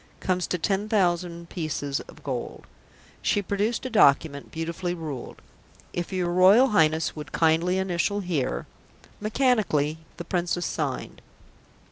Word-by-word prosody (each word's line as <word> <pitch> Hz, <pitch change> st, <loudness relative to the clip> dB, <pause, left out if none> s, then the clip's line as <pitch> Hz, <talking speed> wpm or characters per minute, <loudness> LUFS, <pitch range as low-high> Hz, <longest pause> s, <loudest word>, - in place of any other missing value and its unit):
comes 185 Hz, -1 st, 0 dB
to 180 Hz, -, -1 dB
ten 195 Hz, +5 st, -1 dB
thousand 175 Hz, -4 st, 0 dB
pieces 150 Hz, -5 st, -3 dB
of -, -, -15 dB
gold." 130 Hz, -4 st, -5 dB, 0.6 s
She -, -, +2 dB
produced 205 Hz, +6 st, -1 dB
a -, -, -2 dB
document, 140 Hz, -7 st, +3 dB
beautifully 170 Hz, +2 st, -3 dB
ruled. 150 Hz, -7 st, -7 dB, 0.5 s
"If 175 Hz, -1 st, -3 dB
your 180 Hz, -2 st, -1 dB
Royal 195 Hz, +9 st, +6 dB
Highness 160 Hz, -6 st, +2 dB
would 150 Hz, -1 st, -8 dB
kindly 165 Hz, +3 st, +2 dB
initial 190 Hz, +2 st, 0 dB
here 145 Hz, -, -2 dB, 0.3 s
" -, -, -27 dB
Mechanically 210 Hz, -, +1 dB, 0.2 s
the 170 Hz, -, -6 dB
Princess 175 Hz, -1 st, -1 dB
signed. -, -, -3 dB
175 Hz, 130 wpm, -26 LUFS, 160-195 Hz, 0.6 s, Royal